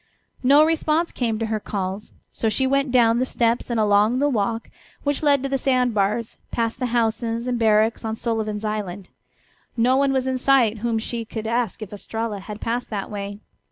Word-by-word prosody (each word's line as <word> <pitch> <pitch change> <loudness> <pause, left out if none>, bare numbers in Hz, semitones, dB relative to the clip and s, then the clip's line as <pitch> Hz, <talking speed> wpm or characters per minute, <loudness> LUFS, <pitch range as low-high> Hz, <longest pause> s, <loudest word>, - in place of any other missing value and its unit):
No 285 +4 +6
response 325 +1 +1
came 230 -3 -1
to 225 - -2
her 220 -1 -1
calls, 195 0 -4 0.2
so 225 - 0
she 265 +5 +1
went 275 0 +1
down 235 -2 +4
the - - +2
steps 235 0 0
and 235 -2 0
along 210 +3 +3
the 290 +2 +2
walk 225 -2 -1 0.3
which 285 -1 0
led 285 -3 +3
to 275 - -2
the 270 0 0
sand 250 -2 +2
bars, 210 +3 -1
past 230 -1 -2
the 255 - 0
houses 230 0 0
and 250 -1 -1
barracks 220 0 +3
on 220 0 -2
Sullivan's 220 -2 -2
island. 200 -3 -4 0.7
No 245 +3 +4
one 275 0 +3
was 265 -1 0
in 260 -1 -1
sight 245 -5 +3
whom 230 +1 0
she 230 +1 -2
could 220 0 -6
ask 230 -2 -1
if 210 - -10
Estralla 220 +1 -4
had 210 +2 -8
passed 240 +2 -2
that 205 -2 -4
way. 200 0 -6
230 Hz, 195 wpm, -23 LUFS, 215-255 Hz, 0.7 s, No